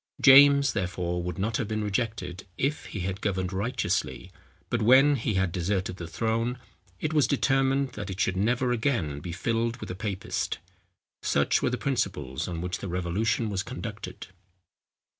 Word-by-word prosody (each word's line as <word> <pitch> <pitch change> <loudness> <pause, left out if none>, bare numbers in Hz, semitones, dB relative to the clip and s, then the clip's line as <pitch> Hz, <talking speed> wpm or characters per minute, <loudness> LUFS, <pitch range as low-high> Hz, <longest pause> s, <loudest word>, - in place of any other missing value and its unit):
James, 140 +1 +7
therefore, 90 -3 -2
would 90 -1 -4
not 110 +4 -1
have 120 - -2
been 110 0 -2
rejected 105 -3 -3
if 145 +3 -1
he 100 - -5
had 95 +2 -3
governed 95 -2 -1
righteously; 95 - -2 0.4
but 120 - +1
when 135 +6 +6
he 110 -4 -1
had 95 -2 +1
deserted 95 +1 -1
the 85 - -6
throne, 115 +6 -1 0.4
it 155 - -2
was 150 -3 +4
determined 135 0 +2
that 105 -3 -6
it 95 0 -6
should 95 - +1
never 120 +6 +1
again 115 - 0
be 85 +4 -6
filled 115 +6 -1
with 120 - -7
a - - -5
papist. 100 -1 -3 0.6
Such 70 - +2
were - - +2
the 125 - -2
principles 95 - -2
on 85 -2 -4
which 90 0 -3
the - - -5
revolution 100 +6 0
was 95 -1 -1
conducted. 105 -5 -7
105 Hz, 165 wpm, -27 LUFS, 90-125 Hz, 0.6 s, James